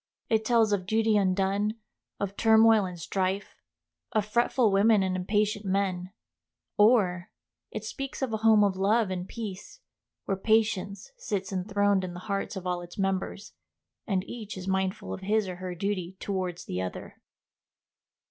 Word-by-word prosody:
It 220 -1 +3
tells 225 -2 +3
of 185 -2 -1
duty 220 0 +2
undone, 200 +2 +1 0.4
of 200 -1 -3
turmoil 220 -1 +5
and 180 -2 -7
strife, 190 +3 -2 0.6
of 210 - +2
fretful 235 +1 +2
women 200 +1 +4
and 185 -1 -1
impatient 205 +3 0
men; 190 -2 -1 0.6
or, 205 -5 +3 0.4
it 215 - -6
speaks 275 +4 -5
of 245 -4 -2
a - - +1
home 220 -1 +5
of 200 -2 +2
love 200 +2 +2
and 180 0 -4
peace, 210 - -7 0.5
where 195 - 0
patience 200 - 0
sits 200 - -3
enthroned 200 +1 +1
in 175 -1 -5
the 180 - -7
hearts 200 +1 -3
of 190 -1 -6
all 180 -1 -1
its 175 0 -11
members, 195 +1 -2 0.5
and 190 -3 0
each 215 -5 -7
is 185 0 -7
mindful 190 0 -1
of - - -6
his 210 +1 +1
or 180 -1 -5
her 180 -1 -5
duty 190 -1 -3
towards 185 -3 -3
the 90 - -3
other. 95 -1 -7
200 Hz, 155 wpm, -28 LUFS, 185-215 Hz, 0.6 s, turmoil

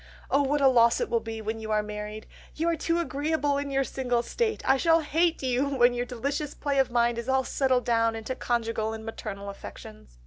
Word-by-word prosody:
Oh 280 - +4
what 285 +1 +1
a 275 - +6
loss 235 -2 +5
it - - -2
will 235 - +3
be 225 -1 -6
when 220 +1 -3
you 220 0 -7
are 215 -1 +1
married! 210 +1 -6 0.3
You 330 +2 0
are 335 - +1
too 330 +1 0
agreeable 290 -2 0
in 285 0 -4
your 275 0 +1
single 245 -3 -1
state. 445 - -1
I 265 - +6
shall 330 +3 +4
hate 325 +1 +1
you 260 +2 +1
when 250 -3 +4
your 245 0 -2
delicious 280 +5 -3
play 280 -2 -1
of 265 - +3
mind 235 -1 +1
is 235 +2 -5
all 265 0 +3
settled 260 -2 +1
down 230 -1 +2
into 225 +3 -4
conjugal 230 -3 -1
and 220 0 -7
maternal 200 -3 -6
affections.... 200 - -10
245 Hz, 220 wpm, -27 LUFS, 225-280 Hz, 0.3 s, a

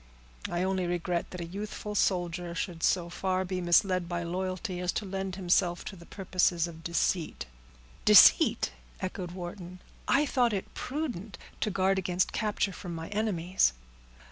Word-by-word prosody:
"I 175 +1 -1
only 190 -1 0
regret 175 0 -1
that 180 - -7
a - - -3
youthful 210 +3 -6
soldier 175 -3 0
should 170 -1 -4
so 175 -1 +2
far 185 +2 -1
be 185 0 -3
misled 175 0 +3
by 175 -1 -2
loyalty 185 +2 -3
as 180 -1 0
to 210 - -2
lend 190 -1 -4
himself 175 -1 +1
to 195 - -6
the 170 -2 -14
purposes 180 -3 +1
of 165 -1 -11
deceit." 170 0 -1 0.6
"Deceit!" - - +7 0.3
echoed 185 -1 -4
Wharton. 180 0 -7 0.3
"I 295 +2 +4
thought 245 -5 +2
it 195 - -4
prudent 250 - -4 0.2
to - - 0
guard 195 0 +2
against 180 0 0
capture 210 -2 0
from 175 -3 -7
my 165 0 -6
enemies." 190 - +1
185 Hz, 155 wpm, -29 LUFS, 175-195 Hz, 0.6 s, Deceit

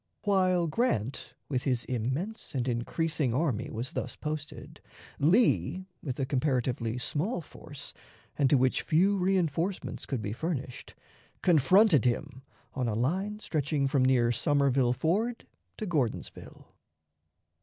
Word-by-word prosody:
While 185 -3 +3
Grant 150 - -1
with 130 -3 -1
his 125 -3 -1
immense 130 - -3
and 125 -1 -1
increasing 125 +2 0
army 135 -7 0
was 120 +4 -4
thus 125 - -4
posted, 150 0 -6 0.4
Lee, 185 - +3 0.2
with 130 -3 -5
a 135 - +1
comparatively 125 -4 0
small 165 - -2
force, 145 -3 -10 0.4
and 140 -3 +2
to 145 - +5
which 130 0 +2
few 190 +5 +2
reënforcements 180 -1 -1
could 125 -5 -3
be 105 - -3
furnished, 135 -2 -5 0.5
confronted 175 - +5
him 130 +2 -1 0.3
on 130 -2 -1
a 110 - -1
line 190 - -1
stretching 145 -4 0
from 135 -1 +2
near 125 -2 +3
Somerville 135 0 +2
Ford 200 - -1 0.3
to 215 - -4
Gordonsville. 145 - -3
145 Hz, 125 wpm, -29 LUFS, 125-175 Hz, 0.5 s, to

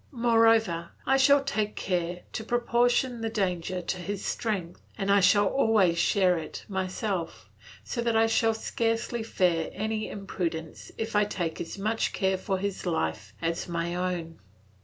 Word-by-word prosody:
Moreover, 225 - +3 0.2
I 270 +1 +4
shall 280 +1 +5
take 215 -6 -1
care 175 -1 -2
to 220 - -3
proportion 240 +1 +1
the 225 - -1
danger 185 -4 -2
to 185 - -2
his 200 +2 -4
strength, 190 -7 -3 0.2
and 200 -1 0
I 200 - +6
shall 205 +2 +5
always 200 -7 +3
share 180 -2 +3
it 155 - -8
myself, 190 -1 -3 0.3
so 235 - -3
that 235 -1 +1
I 225 - +5
need 225 0 +2
scarcely 225 +1 -1
fear 180 -7 +1
any 215 +1 -2
imprudence 170 -5 -5
if 220 -1 -3
I 210 0 +4
take 175 -5 -3
as 165 - -6
much 215 +3 -1
care 190 -1 +1
for 190 0 -1
his 195 -1 -3
life 80 - -2
as 165 +1 -1
for 175 - -8
my 170 +1 -1
own. 175 -2 -3
200 Hz, 160 wpm, -28 LUFS, 175-225 Hz, 0.3 s, I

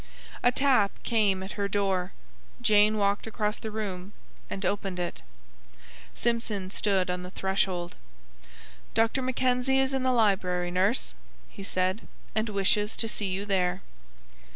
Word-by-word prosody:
A 245 - +4
tap 255 -6 +4
came 205 -5 +2
at 190 - -6
her 200 -1 -2
door. 195 -2 0 0.5
Jane 210 +1 +4
walked 200 +1 +1
across 210 -1 -1
the 220 - -5
room, 200 -3 -5 0.4
and 195 0 -4
opened 195 -2 -1
it. 175 -1 -3 0.9
Simpson 220 -5 -1
stood 190 -3 +1
on 180 0 -3
the 180 - -7
threshold. 190 -2 -1 1.0
"Dr. 225 +4 +2
Mackenzie 255 +1 +1
is 270 0 +2
in 265 - 0
the 255 0 +2
library, 185 -6 +2
nurse," 190 - +1 0.4
he - - -11
said, 185 +2 0 0.3
"and 220 +1 0
wishes 205 +1 +1
to 225 - 0
see 210 -2 -1
you 190 +2 -2
there." 185 -2 0
200 Hz, 140 wpm, -28 LUFS, 185-225 Hz, 1.0 s, A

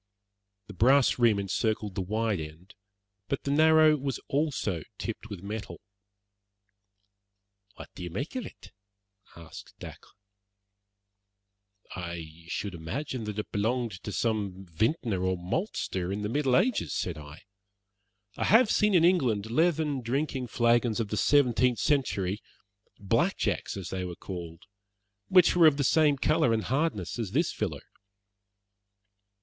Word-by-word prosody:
The - - -11
brass 130 +2 +4
rim 115 -4 +4
encircled 105 +1 -1
the 95 - -2
wide 110 +1 -1
end, 80 +5 -10 0.5
but 140 - -3
the 140 - -2
narrow 155 +1 +5
was 135 -3 -3
also 135 - -1 0.2
tipped 110 -1 -6
with 100 -4 -8
metal. 105 +1 -6 2.0
"What - - -11
do - - -10
you 90 - -5
make 125 - -5
of 255 - -2
it?" - - -15 0.6
asked 85 -2 -12
Dacre. - - -11 1.9
"I 85 -2 -7
should 100 +2 -4
imagine 115 - -5
that 105 -1 -5
it 105 - -4
belonged 115 +3 0
to 105 - -6
some 100 -4 -2
vintner 110 - -1
or 95 0 0
maltster 95 - -3
in 105 +1 -3
the 105 - -2
Middle 135 0 +1
Ages," 250 - 0
said 85 -4 -3
I. 75 +1 -12 0.9
"I - - -2
have 225 +2 +5
seen 210 -2 +3
in 170 -1 +5
England 120 - +2
leathern 155 -1 +1
drinking 130 +1 -2
flagons 120 0 +2
of 110 -3 -2
the 105 - -2
seventeenth 125 -3 +3
century 105 -9 0 0.6
'black 100 -2 +1
jacks' - - -2
as 95 -3 -6
they 95 -1 -3
were 90 -1 -5
called 85 -3 -8 0.6
which 180 -2 +5
were 170 -2 +7
of 145 -2 +4
the 140 - +1
same 150 0 +3
colour 155 -3 +2
and 110 -1 0
hardness 130 - -1
as 105 -4 -4
this 165 +4 +1
filler." 85 -10 -4
115 Hz, 140 wpm, -28 LUFS, 95-140 Hz, 2.0 s, were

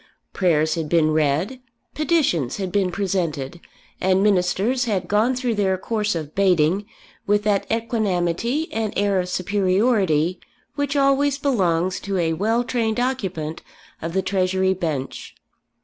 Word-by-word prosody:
Prayers 160 -4 +2
had 160 -3 -3
been 160 -2 +3
read, 155 - 0 0.3
petitions 295 - +1
had 190 -3 -3
been 195 -2 +1
presented, 175 -5 -2 0.4
and 190 +1 +3
Ministers 205 +6 +2
had 195 -6 -1
gone 220 +6 +2
through 250 -2 -1
their 195 -3 +1
course 210 0 -1
of 155 -2 -5
baiting 185 0 +2 0.4
with 205 0 +2
that 205 -2 0
equanimity 225 - 0
and 220 -2 -2
air 200 -1 +2
of 180 0 -2
superiority 185 -3 +1 0.3
which 285 -1 -2
always 280 0 +3
belongs 185 - +1
to 200 -1 -3
a 165 -2 +1
well 220 +8 +1
trained 230 -2 -1
occupant 190 -11 -2 0.4
of 165 +1 -4
the 190 0 0
Treasury 190 0 +1
bench. 155 -8 -4
190 Hz, 135 wpm, -22 LUFS, 170-225 Hz, 0.4 s, been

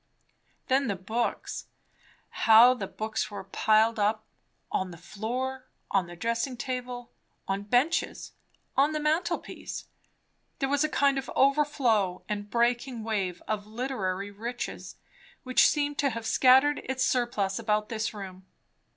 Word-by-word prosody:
Then 270 0 +2
the 200 - 0
books. 220 +6 -3 0.6
How 230 +3 +7
the 210 -6 -5
books 215 +1 -3
were 205 - -7
piled 220 +3 +2
up, 215 +1 +1 0.5
on 185 - -1
the 175 - -10
floor, 255 +8 -4 0.2
on 190 -3 +2
the 175 - -9
dressing 230 +6 -2
table, 250 -1 -5 0.4
on 195 +1 -1
benches, 245 +11 0 0.4
on 285 +3 +3
the 305 - -1
mantelpiece; 315 +4 -2 0.7
there 270 - -1
was 285 +1 +2
a 310 - +1
kind 275 -1 +2
of 270 - -7
overflow 265 -10 +2
and 205 -1 -4
breaking 240 +1 0
wave 195 -5 -2
of 210 -1 -2
literary 205 -5 -3
riches 235 +4 -6 0.5
which 255 -1 +5
seemed 290 -1 0
to 280 - +3
have 230 -2 -5
scattered 265 +5 +5
its 260 0 0
surplus 235 -7 0
about 210 -1 0
this 220 -1 -2
room. 190 -3 -9
230 Hz, 135 wpm, -28 LUFS, 205-265 Hz, 0.7 s, How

